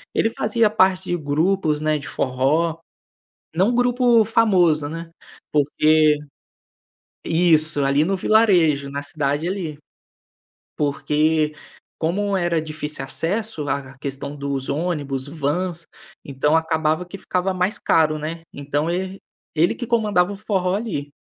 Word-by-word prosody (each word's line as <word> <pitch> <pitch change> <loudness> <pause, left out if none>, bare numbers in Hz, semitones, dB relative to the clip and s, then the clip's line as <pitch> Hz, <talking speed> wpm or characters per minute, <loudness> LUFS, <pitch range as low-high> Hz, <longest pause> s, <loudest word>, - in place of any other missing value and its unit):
Ele 225 - +2
fazia 220 +1 +1
parte 190 -3 +3
de 175 - -1
grupos, 155 +1 0
né, 155 0 +1
de 145 - -9
forró. 145 +7 0 0.8
Não 195 +8 +3
grupo 245 -2 +4
famoso, 180 -10 +3
né, 165 +1 -7 0.4
porque 155 +1 +3 1.1
Isso, 155 -4 +3
ali 140 +3 +3
no 195 0 0
vilarejo, 175 -10 +3
na 140 +1 -4
cidade 145 +1 -2
ali. 180 -6 -4 1.0
Porque 150 +1 +1 0.5
como 195 +5 0
era 170 -2 0
difícil 150 -3 -5
acesso 195 +3 -2
lá 140 0 -1
a 135 - -18
questão 140 +1 -5
dos 140 -2 -3
ônibus, 145 -4 -2
vans, 165 +3 -2 0.4
então, 145 +3 +1
acabava 160 +1 0
que 195 +3 -9
ficava 185 0 -1
mais 185 +3 -1
caro, 155 -1 +2
né. 165 +2 -5
Então, 145 +3 -2
ele 190 +2 -3 0.4
ele 165 +3 +3
que 240 - -6
comandava 205 -5 +2
o - - -7
forró 190 -3 0
ali, 175 -10 -4
160 Hz, 130 wpm, -21 LUFS, 145-190 Hz, 1.1 s, grupo